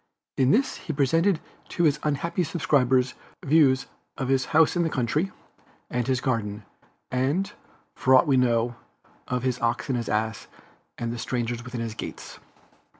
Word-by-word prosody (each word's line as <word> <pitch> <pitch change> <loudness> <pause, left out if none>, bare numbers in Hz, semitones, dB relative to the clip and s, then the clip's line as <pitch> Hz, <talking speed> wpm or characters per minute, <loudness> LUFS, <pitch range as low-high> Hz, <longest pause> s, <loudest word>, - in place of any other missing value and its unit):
In 130 -1 +3
this 260 - +2
he 160 - -5
presented 165 +6 +2 0.3
to 175 - -1
his 150 -2 +3
unhappy 155 +4 -1
subscribers 135 -6 +2 0.3
views 135 -3 +4 0.3
of 130 -1 -2
his 135 -1 +2
house 160 +2 +4
in 175 - +2
the 165 - +1
country, 150 - 0 0.6
and 125 -1 -1
his 130 -1 +1
garden, 105 -6 -2 0.5
and, 150 +11 0 0.4
for 130 0 +4
aught 130 - +6
we 140 - +3
know, 120 -2 +2 0.5
of 125 -1 -2
"his 125 -2 0
ox 120 +3 0
and 130 - +1
his 115 - -3
ass, 110 +1 -1 0.5
and 115 0 -3
the 120 - -6
stranger 120 0 -2
within 125 -1 -5
his 115 -1 -3
gates." - - -8
130 Hz, 160 wpm, -26 LUFS, 120-150 Hz, 0.6 s, aught